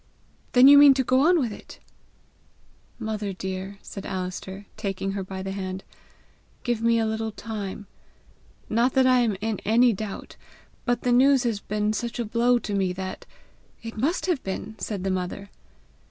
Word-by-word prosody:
"Then 250 +1 +8
you 285 0 +9
mean 285 -2 +8
to 265 - +1
go 255 +1 +3
on 355 0 +5
with 245 -6 -1
it?" - - -12 1.2
"Mother 215 -3 -3
dear," 190 +1 -5
said 195 - -8
Alister, 190 +1 -5
taking 195 -2 -3
her 195 0 -3
by 190 0 -6
the 195 - -4
hand, 190 -1 -5 0.8
"give 240 -3 -1
me 230 0 +3
a 225 - +1
little 220 0 -2
time. 210 -2 -6 0.8
Not 235 +3 +2
that 265 -1 +4
I 255 -1 +5
am 225 -5 +1
in 220 -2 -2
any 235 +2 +4
doubt 205 0 -7 0.5
but 240 -1 0
the 250 - +2
news 265 +2 +5
has 230 -4 -1
been 210 +1 -1
such 235 +2 -3
a 240 - -2
blow 235 +3 +2
to 215 -3 -4
me 190 -2 0
that 185 0 -6 0.3
" - - -34
"It 225 0 -7
must 285 +11 0
have 350 -8 0
been!" 195 +3 -5
said 200 -1 -4
the 195 - 0
mother. 185 +2 -4
220 Hz, 180 wpm, -25 LUFS, 195-240 Hz, 1.2 s, you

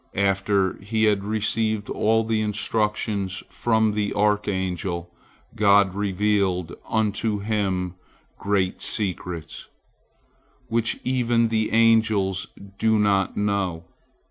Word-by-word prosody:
After 95 -1 +1
he 110 +2 -1
had 105 -2 +2
received 110 0 0
all 110 +1 +1
the 110 -1 0
instructions 105 -2 -1
from 110 -2 +1
the 105 -1 -2
archangel, 95 -4 -1 0.4
God 100 -2 +4
revealed 100 -3 0 0.2
unto 110 0 0
him 100 -4 -1 0.5
great 100 -2 0
secrets, 90 -5 -4 1.0
which 115 0 0
even 120 -2 +1
the 110 -1 0
angels 110 -4 +3 0.3
do 110 0 +3
not 100 -2 +1
know. 100 -5 -1
105 Hz, 95 wpm, -24 LUFS, 95-110 Hz, 1.0 s, God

